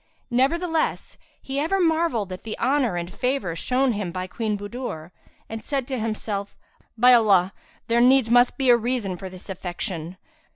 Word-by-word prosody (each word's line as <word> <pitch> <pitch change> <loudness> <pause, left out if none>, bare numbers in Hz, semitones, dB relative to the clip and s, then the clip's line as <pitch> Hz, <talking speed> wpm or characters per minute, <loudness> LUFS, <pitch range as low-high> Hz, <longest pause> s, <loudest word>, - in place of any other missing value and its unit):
Nevertheless, 320 +6 0 0.2
he 270 +1 -4
ever 350 +7 0
marvelled 320 - +1
at 185 - -8
the 220 - -6
honour 255 -5 +1
and 175 +1 -5
favour 250 -10 -1
shown 255 +9 +1
him 200 -4 -3
by 185 +1 -4
Queen 210 +2 -3
Budur 205 -6 -6 0.4
and 225 0 -7
said 270 -4 -2
to 260 -2 -2
himself, 215 -2 -4 0.4
"By 250 +2 +7
Allah, 200 -5 +4 0.3
there 235 +1 +3
needs 250 -2 +5
must 245 +1 +4
be 265 -2 +4
a 240 - +6
reason 235 -5 -2
for 190 +2 -8
this 185 0 -13
affection! 180 -2 -5
230 Hz, 165 wpm, -24 LUFS, 190-260 Hz, 0.4 s, By